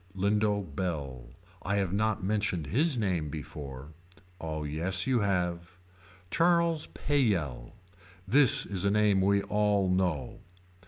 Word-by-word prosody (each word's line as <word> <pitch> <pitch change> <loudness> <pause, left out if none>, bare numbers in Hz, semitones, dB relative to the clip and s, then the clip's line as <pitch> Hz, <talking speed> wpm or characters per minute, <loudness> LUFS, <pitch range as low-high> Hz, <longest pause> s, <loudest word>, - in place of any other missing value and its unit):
Lindo 100 +1 +1
Bell. 70 -7 -5 0.3
I 100 - -1
have 95 -3 0
not 110 -1 0
mentioned 100 -5 -1
his 135 - +1
name 90 -8 -1
before. 70 -2 -8 0.5
Oh 80 -1 -4
yes 85 +6 -1
you 130 -2 +2
have. 90 -3 -2 0.5
Charles 170 -2 +2
Pleyell. 90 - -1 0.5
This 135 +4 +5
is 95 -2 -3
a 100 - +2
name 105 -2 +3
we 100 +1 +2
all 105 -2 +1
know. 90 -9 -1
95 Hz, 120 wpm, -29 LUFS, 80-105 Hz, 0.5 s, This